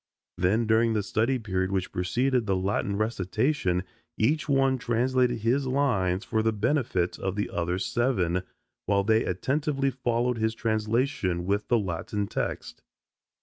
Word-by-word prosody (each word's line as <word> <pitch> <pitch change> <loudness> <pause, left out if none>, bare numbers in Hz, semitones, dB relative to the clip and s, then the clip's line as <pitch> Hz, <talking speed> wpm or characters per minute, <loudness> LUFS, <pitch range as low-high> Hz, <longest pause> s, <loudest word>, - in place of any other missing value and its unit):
Then 105 +6 +2
during 110 +1 +3
the 105 -2 0
study 115 +6 +1
period 95 -4 -2
which 95 -1 -1
preceded 120 +6 0
the 95 - +2
Latin 100 +1 -1
recitation 110 - 0 0.3
each 150 +7 +1
one 135 -1 +3
translated 125 0 +1
his 130 +5 +1
lines 105 -9 +1
for 110 -2 0
the 110 0 +2
benefit 110 - 0
of 95 0 -2
the 105 - -2
other 85 +1 -1
seven, 95 -5 0 0.5
while 100 0 +2
they 110 +2 +3
attentively 135 - 0
followed 120 -1 -1
his 110 +1 0
translation 110 -5 0
with 100 +2 0
the 120 - +3
Latin 100 +1 -2
text. - - -4
110 Hz, 145 wpm, -27 LUFS, 95-125 Hz, 0.5 s, during